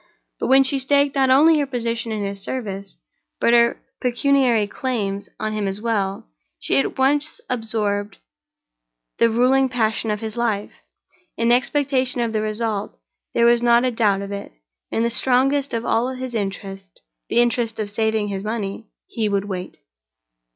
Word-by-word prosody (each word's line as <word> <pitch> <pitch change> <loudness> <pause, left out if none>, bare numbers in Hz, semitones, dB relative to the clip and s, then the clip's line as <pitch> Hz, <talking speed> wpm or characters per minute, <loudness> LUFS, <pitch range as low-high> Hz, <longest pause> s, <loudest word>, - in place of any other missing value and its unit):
But - - -1
when 270 +1 +6
she 270 +1 +1
staked 280 +1 +2
not 265 -1 +3
only 305 +4 +6
her 285 - 0
position 235 -3 -2
in 215 -1 -2
his 200 0 -5
service, 200 -4 -5 0.4
but 235 - +3
her 235 0 +4 0.2
pecuniary 250 -3 +2
claims 205 -4 -3
on 215 0 -2
him 210 -2 -1
as 195 +1 -3
well, 205 -4 -2 0.3
she 135 - +1
at 135 - -2
once 285 +3 +1
absorbed 210 -4 -2 1.0
the 230 - +5
ruling 255 +3 +3
passion 225 -2 0
of 210 -1 -1
his 220 0 -5
life 220 -4 -1 0.7
in 230 +1 +2
expectation 260 0 +1
of 230 -2 -1
the 215 - 0
result. 215 - -3 0.4
There 235 - +4
was 235 0 +4
not 240 +1 +4
a 255 - +1
doubt 205 -4 +1
of 200 - -7
it, 200 0 -6 0.4
in 225 - 0
the 235 - +1
strongest 265 +4 +2
of 230 0 -3
all 235 +2 +1
his 255 -1 -6
interests—the 195 - -5
interest 235 -1 +1
of 215 - -1
saving 220 -1 0
his 195 -1 -4
money—he 215 0 -4
would 200 0 0
wait. 185 -2 -6
230 Hz, 160 wpm, -21 LUFS, 205-255 Hz, 1.0 s, when